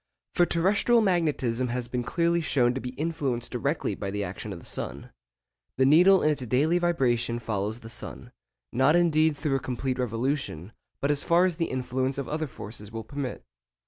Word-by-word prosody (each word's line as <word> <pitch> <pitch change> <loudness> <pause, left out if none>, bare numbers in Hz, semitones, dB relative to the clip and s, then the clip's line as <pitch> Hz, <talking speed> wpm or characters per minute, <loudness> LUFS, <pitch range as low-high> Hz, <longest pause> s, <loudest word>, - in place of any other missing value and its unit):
For 175 - +3
terrestrial 205 +7 +3
magnetism 150 - +1
has 125 0 -3
been 125 0 -2
clearly 170 +6 +1
shown 125 -6 +2
to 130 - -4
be 125 0 -6
influenced 140 -7 -2
directly 140 +5 -1
by 100 - -4
the 100 +1 -2
action - - -6
of - - -6
the - - -13
sun. - - -6 0.7
The 130 - +4
needle 180 +7 +6
in 155 - +4
its 135 -4 -3
daily 150 +9 +2
vibration 120 -9 +1
follows 110 0 -3
the 115 - -10
sun, - - -7 0.4
not 130 +6 +4
indeed 160 -3 +3
through 145 -2 0
a - - -3
complete 130 0 -3
revolution, 120 - -2 0.3
but 140 - +2
as 145 -1 +1
far 170 +2 +4
as 180 -3 0
the 165 - +1
influence 130 +1 -2
of 140 - -3
other 155 +1 -2
forces 105 -4 -8
will 115 0 -5
permit. 135 +2 -5
135 Hz, 185 wpm, -27 LUFS, 120-160 Hz, 0.7 s, needle